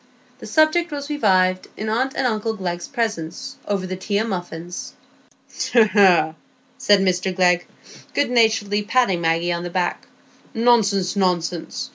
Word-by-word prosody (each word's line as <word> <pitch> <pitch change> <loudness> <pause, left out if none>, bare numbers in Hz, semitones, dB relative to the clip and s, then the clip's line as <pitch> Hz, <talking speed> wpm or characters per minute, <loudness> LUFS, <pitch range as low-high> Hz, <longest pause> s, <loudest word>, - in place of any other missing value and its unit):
The - - -9
subject 315 +2 +2
was 285 0 -5
revived 185 -9 +2
in 215 - -4
aunt 255 +5 0
and 270 - -1
uncle 225 -1 -1
Glegg's 175 -3 -4
presence, 215 - -4
over 200 -2 -1
the 185 0 -4
tea 200 +2 -2
and 220 +2 -1
muffins. 175 -1 -6 0.8
"Hegh, 235 -2 +6
hegh!" 185 -5 +4 0.5
said 205 -6 +4
Mr 185 0 0
Glegg, 180 -1 +2 0.5
good 285 -4 +1
naturedly 220 -3 +2
patting 210 -5 +1
Maggie 165 +1 +1
on 170 - -3
the 175 - -5
back, 175 0 -2 0.5
"nonsense, 215 -5 +2
nonsense! 180 -3 -1
195 Hz, 145 wpm, -21 LUFS, 180-230 Hz, 0.8 s, Hegh